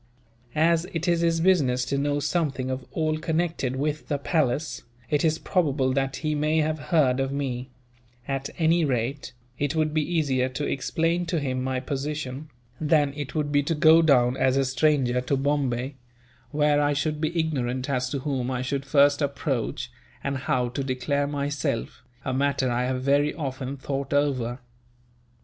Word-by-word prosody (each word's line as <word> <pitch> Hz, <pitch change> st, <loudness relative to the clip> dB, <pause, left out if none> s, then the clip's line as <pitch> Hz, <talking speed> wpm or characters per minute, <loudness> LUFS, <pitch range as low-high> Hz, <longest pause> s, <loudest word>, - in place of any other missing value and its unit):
As 165 Hz, +2 st, +3 dB
it 165 Hz, +1 st, -2 dB
is 170 Hz, -1 st, +3 dB
his 165 Hz, -1 st, +2 dB
business 140 Hz, -9 st, +3 dB
to 140 Hz, -, -1 dB
know 145 Hz, +1 st, 0 dB
something 140 Hz, -5 st, -1 dB
of 130 Hz, 0 st, -5 dB
all 155 Hz, -1 st, 0 dB
connected 160 Hz, -5 st, -1 dB
with 150 Hz, +3 st, -2 dB
the 145 Hz, -, 0 dB
palace, 150 Hz, 0 st, 0 dB, 0.3 s
it 145 Hz, -1 st, +2 dB
is 160 Hz, -1 st, +2 dB
probable 145 Hz, -8 st, +1 dB
that 135 Hz, 0 st, 0 dB
he 155 Hz, 0 st, -2 dB
may 150 Hz, +1 st, +1 dB
have 155 Hz, 0 st, +1 dB
heard 140 Hz, -7 st, +3 dB
of 135 Hz, 0 st, 0 dB
me; 130 Hz, -2 st, -3 dB, 0.6 s
at 135 Hz, 0 st, -2 dB
any 165 Hz, +1 st, +3 dB
rate, 135 Hz, 0 st, -2 dB, 0.3 s
it 145 Hz, +1 st, 0 dB
would 155 Hz, -1 st, +1 dB
be 155 Hz, -, +2 dB
easier 145 Hz, -6 st, 0 dB
to 135 Hz, +3 st, -3 dB
explain 165 Hz, +5 st, 0 dB
to 165 Hz, -1 st, 0 dB
him 130 Hz, -3 st, -2 dB
my 130 Hz, 0 st, -1 dB
position, 140 Hz, +1 st, -4 dB, 0.3 s
than 150 Hz, -2 st, +2 dB
it 145 Hz, 0 st, -6 dB
would 150 Hz, -2 st, 0 dB
be 145 Hz, 0 st, +4 dB
to 160 Hz, +3 st, -1 dB
go 160 Hz, +2 st, +6 dB
down 125 Hz, -5 st, +4 dB
as 130 Hz, 0 st, +2 dB
a 135 Hz, -, +2 dB
stranger 130 Hz, -1 st, +2 dB
to 135 Hz, +2 st, 0 dB
Bombay 135 Hz, -2 st, -1 dB, 0.5 s
where 150 Hz, 0 st, +2 dB
I 145 Hz, 0 st, +2 dB
should 150 Hz, +1 st, -1 dB
be 165 Hz, +2 st, 0 dB
ignorant 130 Hz, -5 st, -1 dB
as 125 Hz, -2 st, 0 dB
to 140 Hz, -, -2 dB
whom 130 Hz, -3 st, -2 dB
I 130 Hz, -1 st, -2 dB
should 140 Hz, +1 st, -3 dB
first 140 Hz, +1 st, +4 dB
approach, 135 Hz, -3 st, -2 dB, 0.3 s
and 140 Hz, 0 st, -1 dB
how 130 Hz, -2 st, 0 dB
to 135 Hz, +3 st, -3 dB
declare 140 Hz, +2 st, -1 dB
myself 140 Hz, -5 st, -2 dB, 0.2 s
a 130 Hz, -, -1 dB
matter 135 Hz, -1 st, +1 dB
I 120 Hz, +1 st, 0 dB
have 130 Hz, 0 st, -2 dB
very 145 Hz, +2 st, +2 dB
often 135 Hz, -2 st, -4 dB
thought 135 Hz, +1 st, -3 dB
over." 130 Hz, -4 st, 0 dB
140 Hz, 175 wpm, -26 LUFS, 130-155 Hz, 0.6 s, go